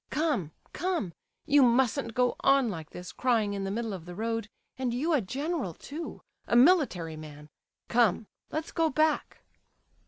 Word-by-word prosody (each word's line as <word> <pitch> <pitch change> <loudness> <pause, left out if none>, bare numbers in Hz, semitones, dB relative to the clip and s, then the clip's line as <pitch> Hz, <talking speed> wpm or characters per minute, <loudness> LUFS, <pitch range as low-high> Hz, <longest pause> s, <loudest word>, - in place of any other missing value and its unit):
Come, 295 - 0 0.2
come, 345 - -1 0.3
you 290 0 +5
mustn't 245 -1 +2
go 250 0 +2
on 275 -3 +4
like 165 -6 -6
this, 180 0 -8
crying 225 -5 +1
in 195 -1 -3
the - - -2
middle 225 +1 -2
of 175 -4 -7
the 175 0 -8
road; 225 +1 -2 0.3
and 250 -2 -2
you 315 +7 +1
a 290 - +3
general 270 - -3
too, 315 +4 -7 0.2
a - - +1
military 240 - +4
man! 150 -1 -10 0.4
Come, 230 -3 +3 0.2
let's 315 +1 -4
go 325 -1 +2
back." 310 +1 0
235 Hz, 160 wpm, -29 LUFS, 195-290 Hz, 0.4 s, you